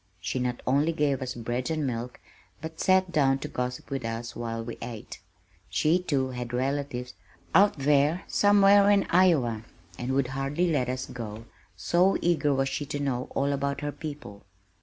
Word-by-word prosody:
She 100 Hz, +8 st, -3 dB
not 125 Hz, -1 st, -2 dB
only 145 Hz, +5 st, +2 dB
gave 145 Hz, -4 st, 0 dB
us 130 Hz, -1 st, -4 dB
bread 120 Hz, +3 st, -3 dB
and 155 Hz, -2 st, -1 dB
milk 120 Hz, -1 st, -4 dB, 0.4 s
but 160 Hz, +1 st, -8 dB
sat 185 Hz, -1 st, +3 dB
down 135 Hz, -4 st, +3 dB
to 135 Hz, -, -6 dB
gossip 125 Hz, +1 st, -4 dB
with 135 Hz, -2 st, -3 dB
us 115 Hz, +1 st, -5 dB
while 115 Hz, -1 st, -4 dB
we 115 Hz, 0 st, -7 dB
ate. 115 Hz, -3 st, -7 dB, 0.5 s
She, 160 Hz, +4 st, +2 dB
too, 140 Hz, -7 st, -1 dB
had 125 Hz, -1 st, -6 dB
relatives 130 Hz, -1 st, -2 dB, 0.4 s
"out 200 Hz, -2 st, +5 dB
there, 145 Hz, +4 st, +2 dB
somewhere 205 Hz, 0 st, +5 dB
in 200 Hz, -1 st, +4 dB
Iowa" 150 Hz, -12 st, +3 dB, 0.4 s
and 125 Hz, +2 st, -2 dB
would 135 Hz, -2 st, +1 dB
hardly 140 Hz, +6 st, -1 dB
let 130 Hz, -5 st, 0 dB
us 130 Hz, 0 st, -3 dB
go, 115 Hz, -2 st, -7 dB, 0.3 s
so 180 Hz, -, +2 dB
eager 165 Hz, -4 st, +1 dB
was 135 Hz, 0 st, +1 dB
she 145 Hz, 0 st, -4 dB
to 145 Hz, -, -4 dB
know 130 Hz, -3 st, -1 dB
all 140 Hz, +1 st, +1 dB
about 140 Hz, +1 st, -2 dB
her 145 Hz, 0 st, -2 dB
people. 145 Hz, -11 st, -8 dB
135 Hz, 175 wpm, -27 LUFS, 125-155 Hz, 0.5 s, out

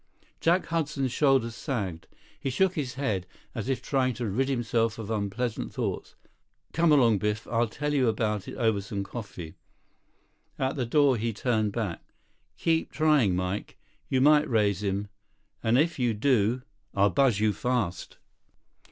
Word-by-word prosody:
Jack 175 Hz, +3 st, +2 dB
Hudson's 150 Hz, -5 st, -1 dB
shoulders 135 Hz, -4 st, +2 dB
sagged. 100 Hz, -, -4 dB, 0.3 s
He 135 Hz, -, -2 dB
shook 185 Hz, +8 st, +2 dB
his 140 Hz, -8 st, -3 dB
head 105 Hz, -10 st, -2 dB, 0.3 s
as 115 Hz, +1 st, -4 dB
if 135 Hz, -, -1 dB
trying 130 Hz, -3 st, +1 dB
to 120 Hz, -, -3 dB
rid 125 Hz, +7 st, 0 dB
himself 115 Hz, -3 st, 0 dB
of 110 Hz, -1 st, -6 dB
unpleasant 110 Hz, +3 st, -2 dB
thoughts. -, -, -4 dB, 0.6 s
"Come 165 Hz, -1 st, +3 dB
along, 120 Hz, -8 st, +5 dB
Biff. 105 Hz, +2 st, -1 dB
I'll 115 Hz, 0 st, +1 dB
tell 150 Hz, +6 st, -3 dB
you 135 Hz, -4 st, +3 dB
about 105 Hz, -3 st, -1 dB
it -, -, -7 dB
over 110 Hz, -5 st, +1 dB
some 100 Hz, 0 st, -4 dB
coffee." 100 Hz, -7 st, -8 dB, 1.0 s
At 130 Hz, +1 st, -1 dB
the 125 Hz, -4 st, -2 dB
door, 140 Hz, 0 st, +4 dB
he 115 Hz, +1 st, -2 dB
turned 110 Hz, -1 st, 0 dB
back. 105 Hz, -8 st, -3 dB, 0.6 s
"Keep 165 Hz, -1 st, 0 dB
trying, 150 Hz, -11 st, +3 dB
Mike. 90 Hz, +3 st, -3 dB, 0.3 s
You 130 Hz, -, +2 dB
might 150 Hz, +1 st, +5 dB
raise 105 Hz, -5 st, +2 dB
him. 100 Hz, 0 st, -1 dB, 0.5 s
And 115 Hz, +1 st, +3 dB
if 160 Hz, +1 st, +1 dB
you 120 Hz, -3 st, +1 dB
do—" 120 Hz, 0 st, +2 dB, 0.3 s
"I'll 100 Hz, 0 st, +4 dB
buzz 130 Hz, -5 st, +3 dB
you 105 Hz, -1 st, +2 dB
fast." 105 Hz, -5 st, -2 dB
120 Hz, 155 wpm, -27 LUFS, 105-135 Hz, 1.0 s, along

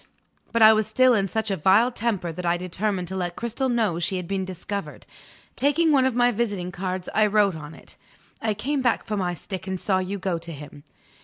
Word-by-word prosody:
But 230 Hz, -1 st, +3 dB
I 220 Hz, 0 st, +9 dB
was 215 Hz, -1 st, +1 dB
still 255 Hz, -1 st, +4 dB
in 200 Hz, -3 st, +2 dB
such 220 Hz, +3 st, -2 dB
a -, -, +1 dB
vile 195 Hz, +9 st, +4 dB
temper 205 Hz, -7 st, -2 dB
that 180 Hz, +3 st, -7 dB
I 175 Hz, 0 st, +1 dB
determined 185 Hz, +1 st, -2 dB
to 190 Hz, -, -5 dB
let 175 Hz, -2 st, -3 dB
Cristel 235 Hz, +3 st, -2 dB
know 220 Hz, -8 st, +1 dB
she 175 Hz, +3 st, -1 dB
had 180 Hz, -2 st, -5 dB
been 195 Hz, 0 st, -2 dB
discovered. 190 Hz, +2 st, -6 dB, 0.5 s
Taking 310 Hz, +4 st, +2 dB
one 265 Hz, -3 st, +4 dB
of 260 Hz, -, -2 dB
my 245 Hz, 0 st, +4 dB
visiting 205 Hz, -6 st, -2 dB
cards, 185 Hz, 0 st, -4 dB
I 215 Hz, -1 st, +4 dB
wrote 205 Hz, -2 st, +3 dB
on 160 Hz, 0 st, -9 dB
it: -, -, -14 dB, 0.4 s
"I 220 Hz, -2 st, 0 dB
came 275 Hz, +6 st, -1 dB
back 245 Hz, -3 st, +1 dB
for 215 Hz, -, -3 dB
my 180 Hz, -3 st, -1 dB
stick, 190 Hz, +1 st, -7 dB
and 190 Hz, -1 st, -3 dB
saw 190 Hz, 0 st, +1 dB
you 190 Hz, +2 st, -3 dB
go 180 Hz, -3 st, -2 dB
to 170 Hz, 0 st, -8 dB
him." 145 Hz, -1 st, -10 dB
195 Hz, 225 wpm, -24 LUFS, 180-225 Hz, 0.5 s, I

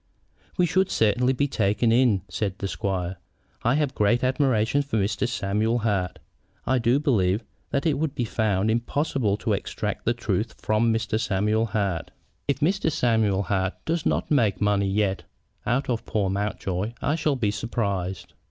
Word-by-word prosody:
"We 180 Hz, -, +4 dB
should 185 Hz, +2 st, +2 dB
certainly 120 Hz, +4 st, +2 dB
be 140 Hz, +2 st, +1 dB
taken 105 Hz, -1 st, +1 dB
in," 115 Hz, -5 st, +3 dB
said 95 Hz, +2 st, -3 dB
the 100 Hz, -, -3 dB
squire. 95 Hz, -2 st, -2 dB, 0.4 s
"I 120 Hz, +4 st, +2 dB
have 145 Hz, -3 st, 0 dB
great 120 Hz, +3 st, +2 dB
admiration 130 Hz, -1 st, +2 dB
for 140 Hz, -5 st, -2 dB
Mr. 100 Hz, +4 st, 0 dB
Samuel 110 Hz, +1 st, 0 dB
Hart. 100 Hz, -6 st, -1 dB, 0.5 s
I 130 Hz, 0 st, +2 dB
do 120 Hz, +4 st, +3 dB
believe 110 Hz, -, +1 dB, 0.3 s
that 140 Hz, +2 st, -1 dB
it 150 Hz, -4 st, +2 dB
would 155 Hz, -2 st, -1 dB
be 120 Hz, -, -1 dB
found 110 Hz, -2 st, +1 dB
impossible 120 Hz, -2 st, 0 dB
to -, -, -1 dB
extract -, -, -3 dB
the -, -, +2 dB
truth -, -, -2 dB
from 110 Hz, +2 st, +2 dB
Mr. 110 Hz, -1 st, 0 dB
Samuel 110 Hz, +1 st, +1 dB
Hart. 100 Hz, -6 st, -1 dB, 0.4 s
If 140 Hz, 0 st, 0 dB
Mr. 180 Hz, +1 st, +2 dB
Samuel 110 Hz, -8 st, +2 dB
Hart 95 Hz, 0 st, -1 dB
does 165 Hz, 0 st, 0 dB
not -, -, 0 dB
make 115 Hz, -9 st, +3 dB
money 100 Hz, -1 st, +2 dB
yet 100 Hz, -1 st, 0 dB, 0.5 s
out 135 Hz, +5 st, +1 dB
of 120 Hz, -3 st, -1 dB
poor 100 Hz, -3 st, 0 dB
Mountjoy 100 Hz, 0 st, -2 dB
I 145 Hz, -, 0 dB
shall 155 Hz, -2 st, +1 dB
be 110 Hz, -6 st, 0 dB
surprised." 100 Hz, -5 st, -3 dB
110 Hz, 165 wpm, -25 LUFS, 100-130 Hz, 0.5 s, We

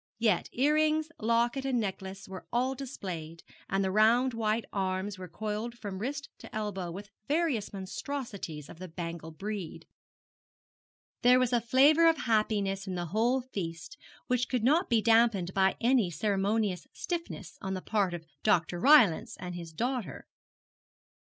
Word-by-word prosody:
Yet 215 Hz, -5 st, +1 dB
earrings, 305 Hz, +3 st, +2 dB
locket, 235 Hz, +4 st, +1 dB
and 265 Hz, -3 st, +1 dB
necklace 195 Hz, -2 st, -5 dB
were 190 Hz, -1 st, -9 dB
all 255 Hz, +2 st, +1 dB
displayed, 180 Hz, -, -7 dB, 0.3 s
and 195 Hz, 0 st, +1 dB
the 190 Hz, -, 0 dB
round 230 Hz, +5 st, +4 dB
white 225 Hz, 0 st, 0 dB
arms 190 Hz, 0 st, -2 dB
were 185 Hz, -, -7 dB
coiled 215 Hz, +6 st, -4 dB
from 200 Hz, -4 st, -6 dB
wrist 275 Hz, +6 st, -3 dB
to -, -, -11 dB
elbow 205 Hz, -4 st, -3 dB
with 200 Hz, +4 st, -8 dB, 0.2 s
various 295 Hz, -8 st, 0 dB
monstrosities 195 Hz, -, -5 dB
of -, -, -12 dB
the 185 Hz, -, -6 dB
bangle 165 Hz, -1 st, -6 dB
breed. 195 Hz, +2 st, -6 dB, 1.4 s
There 250 Hz, 0 st, +6 dB
was 255 Hz, -1 st, +1 dB
a 240 Hz, -, +3 dB
flavour 285 Hz, +8 st, +5 dB
of 325 Hz, -, +2 dB
happiness 210 Hz, -4 st, 0 dB
in 185 Hz, -, -3 dB
the 175 Hz, -1 st, -2 dB
whole 240 Hz, +4 st, +2 dB
feast 180 Hz, -, -6 dB, 0.3 s
which 250 Hz, 0 st, 0 dB
could 250 Hz, -4 st, 0 dB
not 310 Hz, +9 st, +3 dB
be 230 Hz, -3 st, +3 dB
damped 225 Hz, -6 st, +3 dB
by 190 Hz, -1 st, +3 dB
any 240 Hz, -5 st, +3 dB
ceremonious 200 Hz, +1 st, 0 dB
stiffness 330 Hz, -, -5 dB
on 190 Hz, 0 st, -3 dB
the 185 Hz, -, -4 dB
part 200 Hz, -5 st, 0 dB
of 165 Hz, -1 st, -9 dB, 0.2 s
Dr. 175 Hz, +1 st, +2 dB
Rylance 240 Hz, -, +5 dB
and 180 Hz, 0 st, -5 dB
his 170 Hz, -2 st, -7 dB
daughter. 230 Hz, -, -3 dB
215 Hz, 150 wpm, -30 LUFS, 185-250 Hz, 1.4 s, There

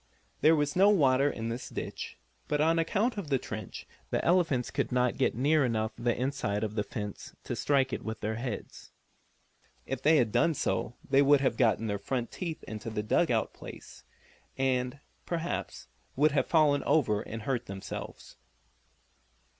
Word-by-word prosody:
There 160 Hz, +1 st, +6 dB
was 145 Hz, -1 st, 0 dB
no 195 Hz, +3 st, +6 dB
water 140 Hz, -7 st, +4 dB
in 115 Hz, -4 st, -4 dB
this 120 Hz, +2 st, -5 dB
ditch -, -, -6 dB, 0.3 s
but 150 Hz, -, 0 dB
on 165 Hz, +2 st, +3 dB
account 210 Hz, +7 st, 0 dB
of 185 Hz, -, -6 dB
the 135 Hz, -, +3 dB
trench 110 Hz, -5 st, -7 dB, 0.2 s
the -, -, -1 dB
elephants 165 Hz, -8 st, +2 dB
could -, -, -1 dB
not 125 Hz, -1 st, +2 dB
get -, -, +1 dB
near 145 Hz, +5 st, +3 dB
enough 110 Hz, -3 st, 0 dB
the 120 Hz, -1 st, 0 dB
inside 125 Hz, -6 st, -1 dB
of 105 Hz, -1 st, -2 dB
the 105 Hz, -, 0 dB
fence 105 Hz, -1 st, -6 dB
to -, -, -4 dB
strike 135 Hz, -3 st, +1 dB
it -, -, -2 dB
with 110 Hz, 0 st, -5 dB
their 110 Hz, +1 st, -1 dB
heads. 120 Hz, -3 st, -6 dB, 0.9 s
If 135 Hz, -1 st, -4 dB
they 155 Hz, +3 st, +5 dB
had 120 Hz, -6 st, +2 dB
done 150 Hz, +8 st, +3 dB
so 120 Hz, -, -1 dB
they 135 Hz, 0 st, +4 dB
would 140 Hz, 0 st, +5 dB
have 135 Hz, -, +1 dB
gotten 115 Hz, -2 st, +2 dB
their 100 Hz, -2 st, -2 dB
front 120 Hz, +4 st, -3 dB
feet 170 Hz, -4 st, -5 dB
into 110 Hz, +2 st, -5 dB
the 105 Hz, -1 st, -3 dB
dug 105 Hz, -, +2 dB
out -, -, 0 dB
place, -, -, -11 dB, 0.5 s
and, 130 Hz, 0 st, 0 dB, 0.3 s
perhaps, 170 Hz, 0 st, -3 dB, 0.3 s
would 150 Hz, +3 st, +4 dB
have 140 Hz, -, +1 dB
fallen 150 Hz, -3 st, +4 dB
over 110 Hz, -9 st, +2 dB
and 110 Hz, 0 st, -7 dB
hurt 125 Hz, -1 st, -2 dB
themselves. 95 Hz, 0 st, -7 dB
130 Hz, 175 wpm, -30 LUFS, 115-150 Hz, 0.9 s, There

